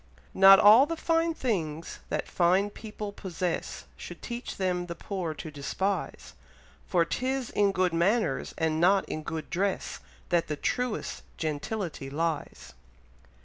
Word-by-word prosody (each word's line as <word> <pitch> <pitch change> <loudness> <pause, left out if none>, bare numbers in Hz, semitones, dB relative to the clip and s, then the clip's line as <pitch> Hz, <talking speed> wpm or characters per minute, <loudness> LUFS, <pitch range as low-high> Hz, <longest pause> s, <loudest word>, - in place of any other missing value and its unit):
Not 195 0 +9
all 220 +7 +8
the 330 +1 -3
fine 330 0 +1
things 165 - -3
that - - -2
fine 185 +4 +2
people 210 -1 -7
possess, 180 -3 -4
Should - - -10
teach 240 0 -5
them 180 -2 -1
the 170 - -5
poor 175 -3 -4
to 155 - -7
despise; 155 +8 -3 0.5
For 170 -3 +3
'tis 255 +7 -2
in 205 -1 +3
good 185 -2 +1
manners, 200 +7 +1
and 160 -1 0
not 190 +2 +4
in 155 - -4
good 160 -1 -6
dress, 190 +2 -1 0.3
That 170 -1 +2
the 150 - -2
truest 250 - -2 0.2
gentility 155 0 -3
lies. 160 +2 -3
185 Hz, 140 wpm, -28 LUFS, 165-210 Hz, 0.5 s, Not